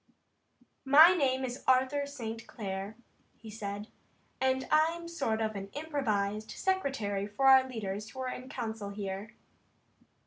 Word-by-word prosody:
"My 305 +6 +8
name 265 -6 +1
is 250 0 -6
Arthur 260 +2 +3
St. 225 -5 -6
Clair," 195 0 -5 0.4
he 220 -1 -11
said, 205 0 -6 0.5
"and 260 0 +1
I'm 320 +2 +3
a - - -7
sort 275 -10 -1
of 215 -1 -2
improvised 215 -3 -2
secretary 270 - -1
for 210 +6 -2
our 265 -1 +7
leaders 210 -3 -4
who 260 - -8
are 260 - -2
in 255 +1 -7
council 220 -5 -4
here." 200 +1 -6
235 Hz, 135 wpm, -31 LUFS, 205-275 Hz, 0.5 s, My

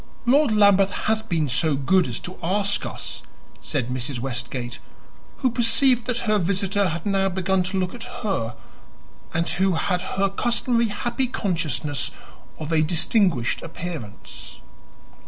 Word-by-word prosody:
"Lord 275 +1 +4
Lambeth 200 -2 +5
has 220 0 0
been 170 -8 0
so 145 +4 +1
good 145 +5 +3
as 120 - -3
to 180 - -7
ask 200 +3 0
us," - - -6 0.4
said 130 -5 -2
Mrs. 125 +1 -2
Westgate, 120 -1 -4 0.7
who 255 - +4
perceived 240 +1 +3
that 240 -2 0
her 215 -1 +3
visitor 195 +2 +1
had 170 -1 -4
now 195 -1 +2
begun 190 0 +1
to 185 +2 -2
look 185 -1 -1
at 240 -1 -7 0.2
her, 125 - -1 0.8
and 165 +1 0
who 190 0 +2
had 180 +2 0 0.2
her 195 0 +3
customary 235 +3 +1
happy 240 +5 -1
consciousness 155 - -1 0.5
of 155 0 -5
a 160 -1 +4
distinguished 165 - +2
appearance. 160 -10 -8
190 Hz, 140 wpm, -24 LUFS, 155-210 Hz, 0.8 s, Lambeth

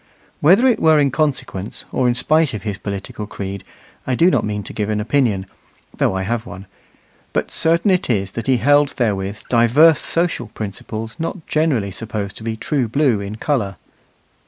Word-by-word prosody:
Whether 190 - +5
it 245 -4 +3
were 160 -1 +5
in 140 -2 +3
consequence 130 -9 -2
or 130 - +1
in 120 - +2
spite 155 +1 +2
of 105 - -6
his 105 -2 -4
political 100 +1 -5
creed, 100 -1 -6 0.4
I 130 - +1
do 170 +7 +4
not - - +2
mean 105 -1 -3
to - - -7
give 105 -1 -2
an 105 -1 0
opinion, 105 -4 +1 0.5
though - - +1
I 95 - -1
have 115 +3 -2
one; 95 +2 -9 0.7
but - - -1
certain 170 +5 +2
it 180 -6 +1
is 100 -5 0
that 115 +1 -5
he 130 -1 +4
held 145 +3 +3
therewith 100 -4 -1
divers 130 +7 +5
social 170 +1 -1
principles 110 +2 -6
not 165 +1 -4
generally 140 -11 0
supposed 105 -1 -5
to - - -10
be 110 0 -3
true 130 +1 -1
blue 130 -2 +2
in 100 +1 -5
colour. 110 -5 -1
115 Hz, 180 wpm, -19 LUFS, 105-150 Hz, 0.7 s, Whether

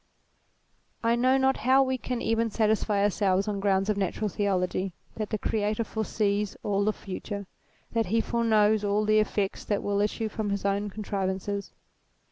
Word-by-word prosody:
I 230 +1 +3
know 255 +2 +3
not 265 0 +2
how 265 +3 +4
we 260 -1 -1
can 245 -1 -3
even 225 0 +1
satisfy 215 -2 +1
ourselves 200 -1 +2
on 205 -1 -1
grounds 195 -1 +2
of 210 -1 +1
natural 200 +2 -1
theology, 185 -1 -1 0.2
that 215 -2 -3
the 215 - -1
Creator 210 +1 0
foresees 210 -2 -1
all 200 -1 +1
the 215 - +2
future; 200 0 -6 0.5
that 230 -3 0
he 225 +5 +2
foreknows 220 -2 +2
all 205 +1 +1
the 215 0 +4
effects 205 -2 -1
that 205 -1 -1
will 205 0 +1
issue 215 +2 -1
from 215 0 -3
his 200 0 -2
own 200 +1 0
contrivances. 200 -1 -3
210 Hz, 165 wpm, -27 LUFS, 200-220 Hz, 0.5 s, how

